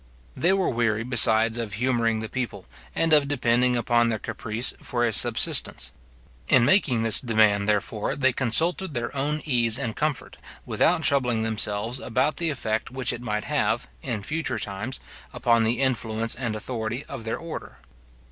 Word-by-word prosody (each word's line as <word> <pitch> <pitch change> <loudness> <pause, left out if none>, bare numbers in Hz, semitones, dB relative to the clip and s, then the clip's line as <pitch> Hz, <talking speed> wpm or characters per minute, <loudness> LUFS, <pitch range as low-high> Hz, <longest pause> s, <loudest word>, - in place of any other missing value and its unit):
They 175 - +2
were 190 -1 +1
weary, 115 -2 0
besides, 115 -2 +4
of 110 -3 -4
humouring 115 -1 0
the 110 - -4
people, 115 -6 -5 0.3
and 165 -1 +2
of 145 -2 +5
depending 125 -2 +1
upon 120 0 +2
their 110 - -1
caprice 115 +2 -1
for 120 -1 -1
a 115 - 0
subsistence. - - +1 0.6
In 125 -2 +5
making 130 - +3
this 115 -2 +6
demand, 110 -4 +2
therefore, 105 +1 -1
they 130 -2 +2
consulted 160 +7 +1
their 120 +3 -4
own 150 +2 -2
ease 120 -5 +3
and 120 -5 -4
comfort, 150 -2 -3 0.3
without - - +1
troubling 125 -5 +2
themselves 110 +2 0
about 130 +6 -1
the 170 -1 0
effect 110 -6 -3
which 130 -1 -2
it 120 - -7
might 105 -3 -3
have, - - -1
in 110 -4 -4
future 160 +8 -3
times, 105 +6 -4 0.3
upon 115 -2 +2
the 115 +2 0
influence 115 -4 0
and 120 -3 -4
authority 115 +3 -4
of 135 -5 -8
their 115 0 -3
order. 165 -1 -8
120 Hz, 165 wpm, -24 LUFS, 110-130 Hz, 0.6 s, this